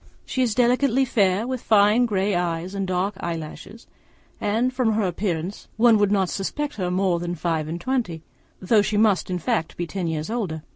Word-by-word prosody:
She 260 - -2
is 235 -4 +1
delicately 255 +1 +3
fair, 200 -3 +2
with 255 -1 -3
fine 215 +3 +4
grey 200 -1 0
eyes 175 +1 -2
and 195 -1 -2
dark 185 +3 0
eyelashes; 170 +6 -6 0.5
and 230 +5 0
from 245 -4 +1
her 215 0 +1
appearance 180 0 -3
one 225 -1 +5
would 205 -1 +2
not 195 -2 +2
suppose 290 +8 -3
her 180 -3 -1
more 180 -1 +1
than 175 0 -3
five 160 -2 -1
and 165 +2 -4
twenty, 180 -8 -2 0.4
though 210 +3 +3
she 205 +1 -1
must 210 -4 +2
in 180 - -1
fact 160 -1 -2
be 175 - -2
ten 180 0 -4
years 160 +3 -3
older. 180 -10 -3
195 Hz, 190 wpm, -23 LUFS, 175-225 Hz, 0.5 s, one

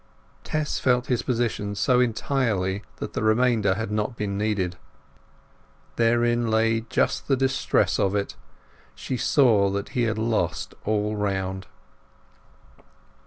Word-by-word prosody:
Tess 155 -1 -2
felt 125 -1 +2
his 120 - 0
position 115 -5 -2
so 125 +4 +2
entirely 115 -6 0
that - - -6
the - - -2
remainder 110 -3 +2
had 110 0 -4
not 105 +3 -2
been 100 -2 -2
needed. 100 -4 -1 1.2
Therein 120 0 +2
lay 115 0 +2
just - - 0
the 135 - +2
distress 135 0 +1
of 100 +1 +1
it; 100 -1 -2 0.6
she 130 - -4
saw 115 -7 +3
that 100 0 -3
he 120 -2 0
had 110 - -3
lost 110 -8 -1
all 105 0 0
round. 95 -2 -2
110 Hz, 125 wpm, -25 LUFS, 100-120 Hz, 1.2 s, saw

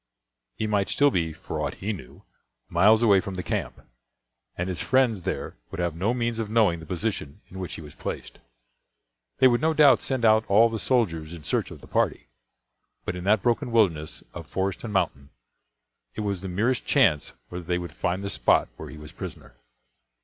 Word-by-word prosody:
He 110 - -2
might 105 -2 +1
still 145 0 +4
be, 85 -6 0
for - - -6
aught - - -2
he 105 +3 -3
knew, 80 -10 -11 0.5
miles 105 +6 +5
away 100 -4 +6
from 100 -2 -6
the 90 - -4
camp, - - -3 0.8
and 90 - -2
his 90 -2 -3
friends 125 -6 +2
there - - -4
would 95 - -7
have 85 -2 -1
no 95 +7 0
means 120 -2 -1
of 110 -2 -2
knowing 105 -7 +3
the 80 - -11
position 95 -2 -3
in 95 - -8
which 90 - -5
he - - -8
was 75 - -11
placed. - - -6 1.0
They 130 - +7
would 120 -1 +2
no 160 0 +2
doubt 150 -3 +6
send 130 -3 -1
out 110 0 +5
all 110 +4 +5
the 110 - -3
soldiers 85 -12 0
in 85 -3 -9
search - - -1
of - - -11
the - - -13
party; - - 0 0.8
but - - -2
in 90 0 -6
that 105 0 +3
broken 120 +2 +1
wilderness 85 -10 +1
of 85 -3 -8
forest 95 +1 -2
and 115 - -5
mountain, 80 -8 -1 0.9
it - - -3
was 100 -3 -2
the 95 - -5
merest 115 +8 0
chance 75 - +3 0.2
whether 90 0 -6
they 90 +1 0
would 90 -1 -6
find 90 +2 -2
the 100 - -1
spot - - +3
where - - -8
he 75 - -10
was 75 -1 -10
prisoner. - - -9
100 Hz, 200 wpm, -26 LUFS, 85-115 Hz, 1.0 s, They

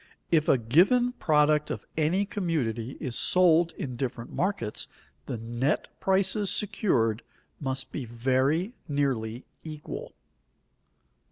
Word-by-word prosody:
If 155 -2 +3
a - - +6
given 185 - +4
product 150 -7 +2
of - - -5
any 165 +6 +2
community 145 - -2
is 130 -6 -4
sold 170 -2 +4
in 125 -6 -5
different 120 -2 -4
markets, 185 - -1 0.4
the 120 - -3
net 120 +6 -1
prices 195 +1 +1
secured 120 - +1 0.4
must 135 -2 -3
be 135 - -4
very 130 - +1
nearly 130 -5 -1 0.2
equal. 155 -2 -7
150 Hz, 110 wpm, -28 LUFS, 120-180 Hz, 0.4 s, a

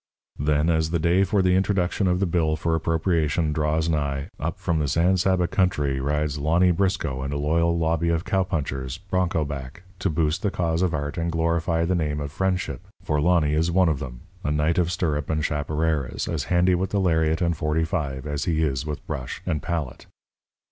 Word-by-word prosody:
Then, 75 +2 +2
as 80 -1 +1
the 85 - +1
day 85 +4 +3
for 100 0 +1
the 90 0 +3
introduction 95 0 +1
of 90 0 +2
the 100 - +2
bill 80 -3 +1
for 80 +1 -1
appropriation 80 -1 +1
draws 75 +1 0
nigh, 70 -4 -1
up 80 +5 -3
from 85 -4 -1
the 75 - 0
San 85 +7 +3
Saba 90 -1 +2
country 85 -7 +1
rides 75 +1 -1
Lonny 85 +5 +3
Briscoe 90 -7 0
and 70 +1 -3
a 70 - -2
loyal 85 +3 +1
lobby 85 0 +1
of 85 0 0
cowpunchers, 75 -8 -1
bronco 90 -3 -1
back, 70 +3 -7 0.2
to - - 0
boost 80 0 0
the 105 - +1
cause 85 -3 -1
of 90 -4 +1
art 75 +3 -3
and 85 0 -1
glorify 85 0 +1
the 90 - +1
name 75 -4 -1
of 70 -1 -4
friendship, 90 -6 -2 0.2
for 75 -1 0
Lonny 80 -3 +3
is 80 +2 +2
one 90 0 +3
of 75 -4 0
them, - - -7 0.2
a - - -1
knight 75 +3 +1
of 85 -1 +1
stirrup 75 -4 -1
and 80 -1 0
chaparreras, 75 -2 -1
as 80 -5 -2
handy 90 +1 +3
with 95 +2 0
the 100 - 0
lariat 80 -3 +2
and 85 -2 +1
.45 75 -3 -1
as 75 -1 -2
he 80 -2 +1
is 70 0 -1
with 75 -1 -5
brush 65 -2 -5
and 75 - -1
palette. 80 -7 -4
80 Hz, 200 wpm, -24 LUFS, 75-90 Hz, 0.2 s, day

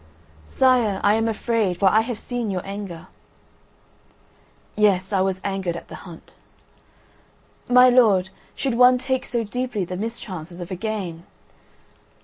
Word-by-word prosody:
"Sire, 240 - +2
I 205 - +4
am 225 +1 +1
afraid, 220 -4 0
for 200 - 0
I 220 - +4
have 230 0 -4
seen 245 -2 -4
your 185 -2 -3
anger. 195 -4 -7 1.7
"Yes, 200 -2 +2
I 190 - +2
was 190 0 0
angered 195 -3 -2
at - - -11
the - - -10 0.2
hunt." 165 - -14 1.4
"My 250 +1 +7
lord, 215 -7 +4 0.3
should 270 -3 -1
one 250 +1 +6
take 260 +1 -2
so 235 -1 -1
deeply 240 -2 -3
the 180 - -6
mischances 185 -6 -6
of 175 +1 -7
a - - -2
game?" 185 -5 -5
210 Hz, 140 wpm, -22 LUFS, 185-240 Hz, 1.7 s, My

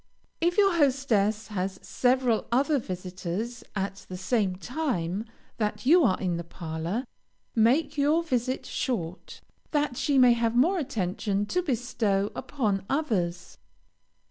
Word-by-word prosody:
If 345 +3 +1
your 395 -4 +4
hostess 230 -8 +2
has 190 -2 -2
several 250 -2 +1
other 280 +4 +3
visitors 185 +4 -5
at 195 0 -4
the 185 - -5
same 190 -1 0
time 210 - -2 0.3
that 215 +2 -2
you 335 +5 +6
are 190 -8 +3
in 180 -3 -1
her 170 - -4
parlor, 170 +7 -4 0.5
make 275 +7 +2
your 305 +4 +3
visit 255 -4 -1
short, 185 -9 -4 0.3
that 295 -4 0
she 285 -2 +1
may 250 -2 +7
have 230 0 0
more 345 +10 +4
attention 205 - -1
to 360 +12 0
bestow 230 - 0
upon 210 -9 -1
others. 190 - -1
230 Hz, 130 wpm, -27 LUFS, 190-275 Hz, 0.5 s, may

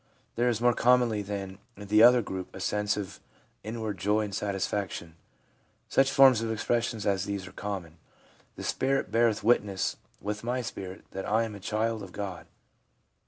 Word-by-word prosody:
There 120 +1 +2
is 115 -3 0
more 120 0 +4
commonly 120 -3 +3
than 100 -1 -5 0.2
in 100 0 -9
the 105 +2 +5
other 120 0 +7
group 95 -2 -6
a - - -7
sense 105 +2 0
of 100 -3 -6 0.4
inward 110 -2 -4
joy 105 +4 +2
and 105 -2 -4
satisfaction. 95 -4 -3 0.7
Such 135 0 +3
forms 130 -4 +6
of 115 -1 -2
expression 115 +1 -1
as 100 -1 +1
these 100 -2 -4
are 90 - -10
common: 90 -5 -6 0.3
' - - -31
The - - -7
spirit 135 -4 0
beareth 115 -1 +2
witness 105 -4 +1 0.2
with 105 +1 -4
my 125 +1 -1
spirit 95 -4 -7
that 95 - -5
I 110 +2 +3
am 110 -2 -5
a 100 - -8
child 110 +2 -1
of 95 -2 -9
God.' 100 -3 -6
105 Hz, 175 wpm, -28 LUFS, 100-115 Hz, 0.7 s, other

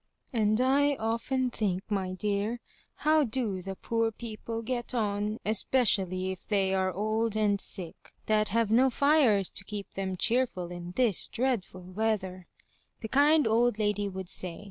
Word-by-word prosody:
" - - -43
And 215 -1 +2
I 280 +3 +3
often 245 +3 -1
think, 195 -5 -1
my 190 -3 -2
dear, 205 +4 -2 0.5
how 310 0 +5
do 225 -6 -2
the 190 +1 -6
poor 230 +3 -1
people 225 0 -6
get 245 +1 -3
on, 210 -1 -1
especially 195 -4 +2
if 190 - -9
they 195 -2 +1
are 190 -1 +1
old 215 +3 -1
and 205 -2 +2
sick, 180 -5 -5
that 215 0 +1
have 225 0 +1
no 255 +4 +5
fires 255 - +3
to - - -4
keep 205 0 -7
them 190 -1 -3
cheerful 225 -6 +1
in 175 0 -7
this 235 -7 +3
dreadful 230 -7 -2
weather," 185 -2 -2 0.5
the 220 - -5
kind 295 +4 +4
old 230 0 +2
lady 205 -1 0
would 190 -1 -7
say. 175 -1 -2
215 Hz, 160 wpm, -29 LUFS, 190-235 Hz, 0.5 s, how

